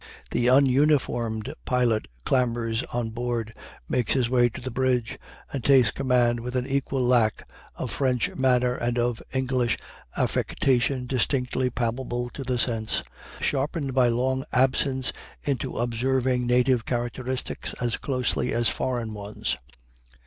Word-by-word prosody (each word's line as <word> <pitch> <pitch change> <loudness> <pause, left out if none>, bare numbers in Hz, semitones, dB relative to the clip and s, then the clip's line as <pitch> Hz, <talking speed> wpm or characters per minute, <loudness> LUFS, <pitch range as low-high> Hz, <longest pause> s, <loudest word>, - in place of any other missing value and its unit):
The 120 - +1
ununiformed 130 -4 +2
pilot 120 - +1 0.2
clambers 120 -3 +1
on 120 -2 -3
board, 120 -1 -3 0.3
makes 125 - +1
his 125 -3 +1
way 120 -1 +4
to - - -8
the 130 +1 -5
bridge, 125 -2 0 0.3
and 135 -4 -3
takes 130 -6 +5
command 125 -3 +2
with 125 +2 -5
an 125 0 0
equal 135 -1 -1
lack 120 -3 +2 0.3
of - - -4
French 125 -4 0
manner 125 -1 +2
and 120 0 -1
of 120 -1 0
English 130 -3 +1 0.4
affectation 130 0 +1
distinctly 125 0 0
palpable 120 +1 -2
to 140 - -6
the 125 -1 -1
sense, 115 -2 0 0.4
sharpened 140 0 -1
by 130 -1 +4
long 130 +2 +1
absence 130 +1 +2 0.3
into 140 -5 -2
observing 125 +1 +1
native 125 -1 +3
characteristics 125 +2 -3
as 120 -2 0
closely 130 -4 -1
as 120 -2 +2
foreign 115 0 -2
ones. 105 0 -3
125 Hz, 130 wpm, -26 LUFS, 120-130 Hz, 0.4 s, takes